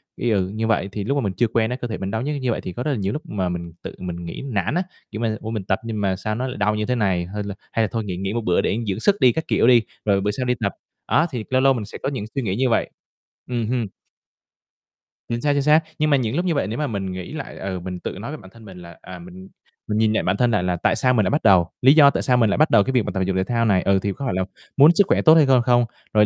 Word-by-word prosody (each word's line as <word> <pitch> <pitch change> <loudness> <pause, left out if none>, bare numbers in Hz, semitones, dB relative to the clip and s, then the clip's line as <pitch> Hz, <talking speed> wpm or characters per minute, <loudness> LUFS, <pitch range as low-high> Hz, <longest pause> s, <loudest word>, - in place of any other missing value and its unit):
ý, 120 - -2
ừ, 95 -3 +1
như 110 +1 -2
vậy, 105 -3 0
thì 100 0 -4
lúc 140 +7 -1
mà 140 - +1
mình 100 -4 -2
chưa 120 +5 +1
quen 110 0 0
á, 125 - -2
cơ 125 -1 -5
thể 110 - -4
mình 95 0 -4
đau 110 +1 -2
nhức 145 +2 -2
như 125 -2 0
vậy - - -2
thì 90 - -6
có 125 - -4
rất 150 - -1
là 135 - -1
nhiều 100 -1 -2
núc 150 - -4
mà 95 -3 -2
mình 85 -1 -5
tự - - -7
mình 85 -1 -6
nghĩ 85 - -6
nản 100 - -1
á. 180 - +1 0.3
Kiểu 110 - -5
mà, 110 -2 0
"Ủa, 110 - -6
mình 110 -4 -3
tập 95 0 0
nhưng 110 -2 -3
mà 95 -2 +1
sao 105 +3 -3
nó 130 +3 -2
lại 130 - -6
đau 105 +1 +1
như 105 0 -1
thế 125 - 0
này, 95 -6 0
hay 105 0 -3
là 100 -1 -6 0.2
hay 115 - +1
là 110 - +1
thôi 115 -2 -2
nghỉ 95 -3 -5
nghỉ 95 +2 -3
một 120 - -1
bữa 90 -4 +2
để 105 - 0
dưỡng 100 +1 -2
sức 200 - +3
đi", 125 - +6
các 160 - -3
kiểu - - +2
đi, 120 -2 +6 0.2
rồi 100 -2 +2
bữa 105 +1 0
sau 125 +4 -3
đi 125 - +2
tập. 100 -3 0 0.3
Á, 160 - +3
thì 120 -4 -4
lâu 130 0 +2
lâu 135 0 +5
mình 115 -5 -4
sẽ - - -9
có - - 0
những 130 -7 -4
suy 135 - 0
nghĩ 100 -6 -2
như 130 +3 +1
vậy. 115 - +1 0.6
Ừm 120 -3 -1
hưm. 120 -1 -1 1.4
Chính 120 0 -3
xác, 145 -1 +2
chính 140 - +1
xác. 150 +3 +5 0.2
Nhưng 155 - +2
mà 140 - +4
những 120 -2 -2
lúc 175 +3 0
như 170 - +1
vậy 140 - 0
nếu 110 +3 -4
mà 150 - 0
mình 100 -5 -3
nghĩ 90 +5 -7
lại, 150 -3 -7
ừ, 95 -1 -4
mình 90 0 -6
tự - - -5
nói 115 +8 -6
với 155 - -6
bản 95 -7 -14
thân 115 -1 -15
mình 95 -3 -11
là 85 0 -12
"À, 90 0 -10
mình 90 +2 -12 0.4
mình 105 - -1
nhìn 110 0 +2
lại - - 0
bản 95 +2 0
thân 120 +1 +2
lại 105 -5 +1
là 90 -1 0
tại 85 - +1
sao 125 0 +2
mình 110 - +3
lại - - +1
bắt 150 - 0
đầu, 90 -5 +4
lý 130 +2 +7
do 150 -3 +7
tại - - -2
sao 125 -2 +3
mình 115 -3 +3
lại 100 - 0
bắt 155 +2 +4
đầu 100 - +5
cái 130 - -2
việc 125 -4 +2
tập 95 - -2
thể 95 - 0
dục 95 0 -1
thể 95 - +2
thao 115 +3 0
này. 95 -4 +3
Ừ, 100 0 +2
thì 100 - -1
có 140 - -6
phải 125 - -1
là 95 +1 0 0.3
muốn 145 +4 +8
sức 200 -2 +4
khỏe - - +2
tốt 160 - +7
hay 160 -3 +6
hơn 130 -2 +4
không? 120 0 +3 0.3
Rồi 105 -1 +5
110 Hz, 340 wpm, -22 LUFS, 95-125 Hz, 1.4 s, muốn